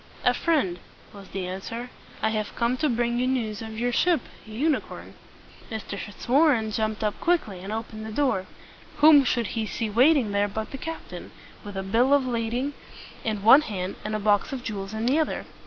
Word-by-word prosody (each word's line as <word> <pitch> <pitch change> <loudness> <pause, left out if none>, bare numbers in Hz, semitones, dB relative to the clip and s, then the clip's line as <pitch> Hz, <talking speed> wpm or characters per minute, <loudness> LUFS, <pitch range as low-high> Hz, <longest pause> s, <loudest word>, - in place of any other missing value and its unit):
"A - - +5
friend," 235 - 0 0.3
was 200 -2 -12
the 190 -1 -4
answer. 230 +7 -6 0.3
"I 220 - +3
have 215 -1 -3
come 235 +1 +1
to 305 +2 +1
bring 240 0 0
you 250 - +1
news 230 -5 -1
of 220 -1 -7
your 245 +2 0
ship 335 +3 +2 0.3
'U 225 +8 -1
ni 300 -4 +3
corn.'" - - -11 0.6
Mr. 220 -2 -5
Fitzwarren 240 +2 +2
jumped 215 0 -1
up 210 -1 -1
quickly, 320 - +1
and 195 +3 -7
opened 220 0 -5
the - - -6
door. 215 -7 0 0.5
Whom 295 -1 +8
should 235 -5 0
he 220 -1 -2
see 220 -1 -3
waiting 255 0 +4
there 200 0 +2
but 215 +2 -5
the 270 - -6
captain, 325 +3 -7 0.3
with 205 -2 -7
a 190 - -2
bill 240 +8 +3
of 275 -2 +1
lading 245 +3 -1 0.5
in 215 -3 -2
one 265 +7 +9
hand 190 -9 -4
and 215 0 -3
a - - -1
box 205 +6 +2
of 265 -3 -5
jewels 195 -4 -5
in 220 +1 -2
the 270 +6 +3
other? 315 - -1
225 Hz, 200 wpm, -26 LUFS, 210-260 Hz, 0.6 s, one